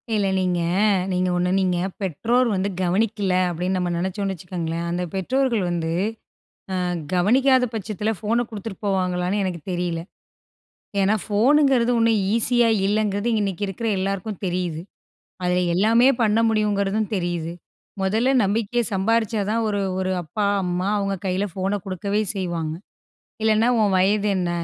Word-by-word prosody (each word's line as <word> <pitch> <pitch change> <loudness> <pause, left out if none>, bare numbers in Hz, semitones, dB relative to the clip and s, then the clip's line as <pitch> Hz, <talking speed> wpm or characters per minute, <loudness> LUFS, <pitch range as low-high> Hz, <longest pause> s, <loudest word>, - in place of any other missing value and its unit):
இல்ல 205 -2 +1
நீங்க 180 -1 0 0.5
நீங்க 180 0 +1
ஒண்ணு 180 0 +1
நீங்க 180 -2 +1 0.2
பெற்றோர் 230 - +1
வந்து 195 +1 0
கவனிக்கல்ல 200 +1 +1 0.2
அப்டின்னு 180 +2 -1
நம்ம 180 -1 -1
நெனச்சோம்னு 190 +3 -2
வச்சுக்கோங்களேன், 170 -1 -4
அந்த 175 +1 -1
பெற்றோர்கள் 235 +3 0
வந்து 170 -2 -2 0.9
ஆ - - -1 0.3
கவனிக்காத 255 +8 +4
பட்சத்ல 215 0 -2
ஃபோன 230 +3 0
குடுத்துட்டு 215 -2 -7
போவாங்களான்னு 185 0 0
எனக்குத் 180 -2 -5
தெரியல. 175 -1 -2 1.0
ஏன்னா 195 +2 +3
ஃபோனுங்றது 250 +2 +3
ஓண்ணும் 225 -2 +3
ஈஸியாக 230 -1 +3
இல்லங்றது, 205 +1 0
இன்னைக்கி 200 -1 -2
இருக்குற 200 +4 -3
எல்லாருக்கும் 195 +1 -3
தெரியுது. 175 -3 -2 0.6
அதுல 180 0 +2 0.2
எல்லாமே 225 +6 +4
பண்ண 220 0 +3
முடியுங்றதும் 210 -1 0
தெரியுது. 175 -3 -2 0.5
மொதல்ல 220 +7 +2
நம்பிக்கைய 225 +4 0
சம்பாரிச்சா 220 +2 +1
தான், 230 +1 +1
ஒரு 205 -1 -1 0.2
ஒரு 185 0 -1
அப்பா 205 +6 -2 0.2
அம்மா 180 +1 -1
அவங்க 195 -1 -1
கையில 190 +2 0
ஃபோன 195 +2 -1
குடுக்கவே 200 +2 -1
செய்வாங்க. 170 -5 -2 0.7
இல்லைனா 220 +1 +3
உன் 200 -2 +2
வயது 205 +3 +2
என்ன? 175 -1 -1
195 Hz, 130 wpm, -23 LUFS, 180-220 Hz, 1.0 s, கவனிக்காத